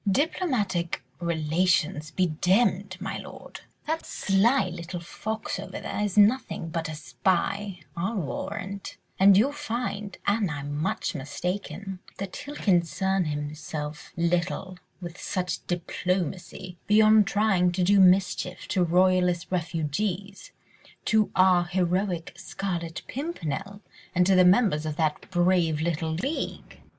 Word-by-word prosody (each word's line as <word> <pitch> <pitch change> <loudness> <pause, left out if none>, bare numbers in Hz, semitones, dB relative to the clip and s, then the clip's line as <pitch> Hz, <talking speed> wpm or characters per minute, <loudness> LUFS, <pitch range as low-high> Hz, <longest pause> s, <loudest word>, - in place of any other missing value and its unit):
"Diplomatic 210 - 0 0.2
relations 160 -1 +1
be 185 +3 +1
demmed, 185 +3 +1
my - - -4
lord! - - -10 0.2
That 320 +2 -2
sly 200 +4 +2
little 175 +1 -6
fox 220 +6 -4
over - - -6
there - - -4
is 210 -1 -1
nothing 210 -5 +3
but 165 -1 -3
a 155 - -5
spy, 190 +3 -1
I'll 190 +7 -2
warrant, 195 +3 -4 0.2
and 195 0 +7
you'll 250 +8 +4
find—an 215 - -2
I'm 145 -1 -4
much 150 +2 -1
mistaken, 180 +5 -4 0.2
that 195 -1 -5
he'll 290 +1 -7
concern 190 - +1
himself 150 0 -5
little 175 +2 -1 0.2
with 175 +1 -6 0.3
diplomacy, 180 0 -3
beyond 215 0 +6
trying 195 -4 +2
to 180 0 0
do 200 +2 +5
mischief 185 -1 +3
to 185 - +2
royalist 180 0 +2
refugees—to 185 +5 -2
our 185 -2 +5
heroic 180 -1 -1
Scarlet 170 -4 -4
Pimpernel 200 - -4 0.3
and 180 0 +4
to 195 - +4
the 185 -1 +6
members 180 -6 +4
of 155 - -3
that 155 -2 -1
brave 175 -3 +2
little 160 0 -1
league." 270 - -4
185 Hz, 120 wpm, -26 LUFS, 170-200 Hz, 0.3 s, and